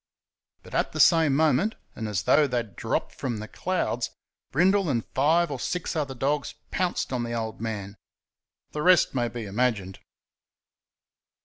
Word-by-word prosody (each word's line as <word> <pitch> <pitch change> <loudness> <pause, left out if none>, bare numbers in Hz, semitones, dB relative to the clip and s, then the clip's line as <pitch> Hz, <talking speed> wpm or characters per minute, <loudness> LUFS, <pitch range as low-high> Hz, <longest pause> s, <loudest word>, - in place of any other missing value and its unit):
But - - -14
at - - 0
the - - -4
same 160 -5 +5
moment, 155 - +2 0.2
and, 110 - -4
as 100 -5 -1
though 150 +7 +4
they 125 -2 -1
had 115 -4 -4
dropped - - -2
from 120 -4 -3
the 110 +1 -6
clouds, 170 -10 -1 0.4
Brindle 185 +4 +3
and 120 -5 0
five 160 +4 +3
or 135 - -4
six 180 +4 -2
other 140 -4 -2
dogs 140 +3 -1 0.2
pounced 180 -7 -1
on 125 - 0
the 120 0 -3
"old 110 -1 -4
man." 105 -3 -4 0.8
The 150 - -3
rest 180 +1 +5
may 120 -3 +1
be 120 -1 -6
imagined. 100 -3 -1
130 Hz, 165 wpm, -26 LUFS, 115-160 Hz, 0.8 s, same